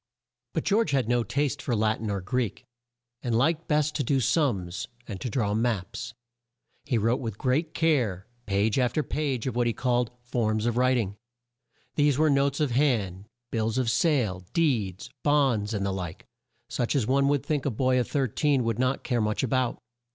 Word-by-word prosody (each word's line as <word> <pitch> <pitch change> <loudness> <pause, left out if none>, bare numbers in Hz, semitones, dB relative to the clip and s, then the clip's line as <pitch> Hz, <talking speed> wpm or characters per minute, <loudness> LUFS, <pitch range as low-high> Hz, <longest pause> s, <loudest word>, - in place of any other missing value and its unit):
But - - -1
George 210 -2 +2
had 135 -5 +1
no 120 0 +2
taste 135 +5 -1
for 120 - -1
Lat 110 0 +1
in 110 - -3
or 100 -1 -2
Greek, 115 +3 -2 0.6
and 120 -2 0
liked 160 +6 +1
best 150 -1 +2
to 145 - 0
do 135 +2 +2
sums, 105 - 0 0.2
and 100 -6 -7
to 125 - -2
draw 105 -3 0
maps. 110 -1 -2 0.7
He 130 -5 +1
wrote 115 +3 +2
with 110 -5 -5
great 145 +7 0
care, 120 - +1 0.2
page 100 +4 +1
after 125 +4 +1
page 140 -7 -2
of 130 - -2
what 120 -1 +2
he 115 - +1
called 120 -1 +1
"Forms 110 -3 0
of 120 - +1
Wri 130 +2 +3
ting." 105 -4 -2 0.8
These 145 -2 +3
were 155 0 +4
notes 140 0 +2
of 150 -4 +1
hand, 110 -8 +1 0.3
bills 110 +1 0
of 125 -3 +1
sale, 125 - +1
deeds, 115 - 0
bonds, 135 -8 +2
and 100 -3 -1
the 100 - -1
like, 90 -4 -6 0.4
such 120 +2 -1
as 130 -6 +2
one 135 +3 +3
would 145 -1 +1
think 145 -3 -1
a - - +3
boy 130 +2 +2
of 120 - 0
13 140 0 +1
would 115 0 -1
not 130 +1 0
care 120 -3 0
much 105 +3 0
a - - +1
bout. 130 0 0
125 Hz, 190 wpm, -27 LUFS, 110-140 Hz, 0.8 s, were